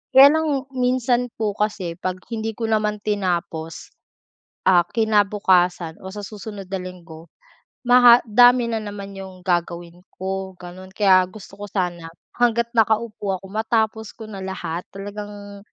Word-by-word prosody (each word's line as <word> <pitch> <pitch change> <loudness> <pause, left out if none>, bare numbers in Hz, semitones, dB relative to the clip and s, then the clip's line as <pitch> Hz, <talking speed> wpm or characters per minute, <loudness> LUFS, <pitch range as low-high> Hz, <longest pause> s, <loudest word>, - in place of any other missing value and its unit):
Kaya 270 +1 +11
lang 300 -4 0
minsan 250 -1 +1
po 215 -2 -1
kasi 200 -6 -2
'pag 185 0 -3
hindi 225 0 -2
ko 225 -1 -3
naman 210 -1 0
tinapos, 175 -5 -3 0.8
ah, 175 -2 +6
kinabukasan 195 -6 +2
o 190 - -7
sa 205 0 -7
susunod 205 -2 -8
na 190 - -2
linggo 170 -3 -10 0.5
maha 245 -1 +7
dami 245 +2 +6
na 225 - -1
naman 200 -1 -8
'yong 190 -1 -9
gagawin 175 0 -3
ko 190 0 -4
ganun. 185 +1 -11
Kaya 190 -2 +5
gusto 200 0 -13
ko - - -5
sana 175 -4 -3 0.3
hangga't 235 -1 +1
nakaupo 215 -4 +1
ako 195 - -12
matapos 220 0 0
ko 225 - -9
na 200 -3 -8
lahat. 180 -2 -4
Talagang 205 0 -8
205 Hz, 140 wpm, -22 LUFS, 185-220 Hz, 0.8 s, Kaya